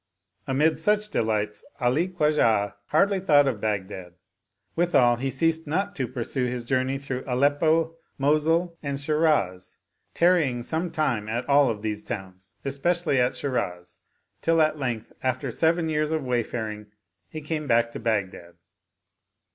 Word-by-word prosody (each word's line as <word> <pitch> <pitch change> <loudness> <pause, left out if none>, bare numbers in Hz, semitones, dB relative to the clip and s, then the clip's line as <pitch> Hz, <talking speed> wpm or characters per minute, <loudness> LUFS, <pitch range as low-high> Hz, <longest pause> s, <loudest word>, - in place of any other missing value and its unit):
Amid 150 +4 +2
such 210 +4 +2
delights 105 - -1 0.2
Ali 130 +8 +1
Khwajah 150 - +2
hardly 195 +5 +2
thought 145 -6 +4
of 115 -6 -2
Bagh 105 -3 -1
dad; 90 -3 -9 0.6
withal 135 -9 +3
he 135 +3 -2
ceased 160 +4 +1
not 195 +6 -1
to 130 -6 -2
pursue 125 +2 -2
his 120 -1 -4
journey 130 +1 0
through 135 -2 -5
Aleppo, 155 +5 +2 0.2
Mosul, 160 +5 +1
and 140 -2 -3
Shiraz, 150 - 0 0.4
tarrying 160 -9 +2
some 165 +6 -2
time 125 -10 -1
at 120 +3 -3
all 140 -1 +5
of 105 -2 -4
these 105 -1 -2
towns, 95 -4 -8
especially 140 +2 0
at 125 0 +1
Shiraz, 90 -10 -3 0.4
till 165 0 +2
at 155 -1 +2
length 120 -5 -3
after 130 0 -1
seven 165 +4 +1
years 155 -1 0
of 160 -2 -1
wayfaring 110 -3 -3 0.4
he 155 - -6
came 155 0 -4
back 115 -1 +2
to - - -7
Baghdad. 95 -6 -2
135 Hz, 145 wpm, -25 LUFS, 115-160 Hz, 0.6 s, all